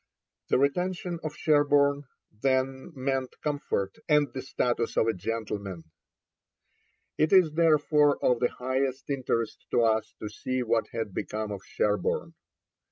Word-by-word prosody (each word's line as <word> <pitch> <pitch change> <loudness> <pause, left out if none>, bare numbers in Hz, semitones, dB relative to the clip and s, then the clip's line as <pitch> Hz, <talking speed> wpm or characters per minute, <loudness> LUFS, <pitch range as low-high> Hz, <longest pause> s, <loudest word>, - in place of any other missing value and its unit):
The - - +4
retention 175 +5 0
of 155 - -4
Sherborne, 145 -1 +3 0.3
then, 130 +5 -1
meant 135 -1 -2
comfort 140 -10 -2
and 150 -4 +3
the 130 - -4
status 120 -3 -1
of - - +4
a 115 - +1
gentleman. 100 -2 -4 1.4
It 155 0 +3
is 185 -5 +6
therefore 150 -2 +3
of 125 -2 +3
the 120 - +2
highest 130 +2 -2
interest 125 -4 -2
to 120 - +3
us 110 -1 +1
to 105 - -6
see 130 +4 -3
what 115 -1 +1
had 110 -4 -4
become 110 +2 -3
of 100 -2 -5
Sherborne. 105 0 -1
130 Hz, 135 wpm, -28 LUFS, 115-145 Hz, 1.4 s, is